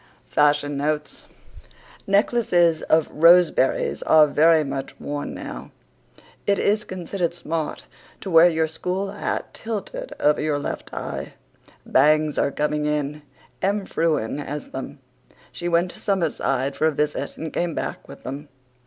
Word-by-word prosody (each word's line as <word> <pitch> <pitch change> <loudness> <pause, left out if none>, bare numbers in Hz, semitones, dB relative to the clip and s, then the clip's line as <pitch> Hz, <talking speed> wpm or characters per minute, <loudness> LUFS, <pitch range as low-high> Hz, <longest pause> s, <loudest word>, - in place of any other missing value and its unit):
FASHION 145 -1 +2
NOTES 150 +1 -3 0.8
Necklaces 195 -5 +3
of 160 0 +2
roseberries 165 -4 +4
are 155 -1 +6
very 160 +2 +4
much 135 -1 -5
worn 145 0 -4
now. - - -7 0.8
It 200 -1 +3
is 210 +1 +1
considered 180 -1 -3
smart 160 -2 -4 0.4
to 190 - -5
wear 165 +1 +7
your 160 -1 +1
school 180 +5 -3
hat - - -4
tilted 230 - -5
over 150 0 +3
your 150 -1 0
left 145 - -5
eye. - - -5 0.5
Bangs 150 +2 +3
are - - +2
coming 150 +1 -1
in. 150 0 -2 0.4
Em 200 +1 0
Frewen 155 -8 0
has 145 0 -6
them. 135 +2 -6 0.5
She 175 - -5
went 175 +1 +2
to - - -14
Summerside 160 -8 0
for 155 - +2
a - - +2
visit 150 0 -2
and 160 -1 -6
came 170 -2 -1
back - - -4
with - - -12
them. 140 +3 -7
155 Hz, 140 wpm, -23 LUFS, 150-175 Hz, 0.8 s, wear